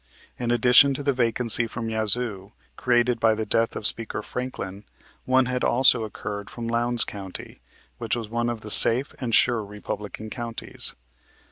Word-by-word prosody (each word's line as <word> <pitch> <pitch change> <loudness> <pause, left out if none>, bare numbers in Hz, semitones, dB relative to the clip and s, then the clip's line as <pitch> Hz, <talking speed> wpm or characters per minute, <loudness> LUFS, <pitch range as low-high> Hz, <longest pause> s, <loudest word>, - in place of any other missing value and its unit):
In 120 -1 -3
addition 125 +3 +4
to 145 - -6
the 140 0 0
vacancy 115 -1 +2
from 115 0 -6
Yazoo, 110 -2 -2 0.2
created 120 -1 0
by 110 -1 +2
the 110 0 -4
death 115 +2 0
of - - -6
Speaker 110 -1 0
Franklin, 105 -6 -7 0.4
one 130 0 +2
had 125 0 -3
also 120 -2 +3
occurred 100 -1 -7
from 115 -1 -7
Lowndes 120 0 0
County, 95 -3 -9 0.4
which 115 -2 -2
was 115 -2 -6
one 120 +2 -2
of 115 -2 -5
the 105 - -5
safe 125 +7 +7
and 120 -4 -1
sure 120 -3 +2
Republican 105 +1 -8
counties. 115 -2 -3
115 Hz, 160 wpm, -23 LUFS, 110-125 Hz, 0.4 s, safe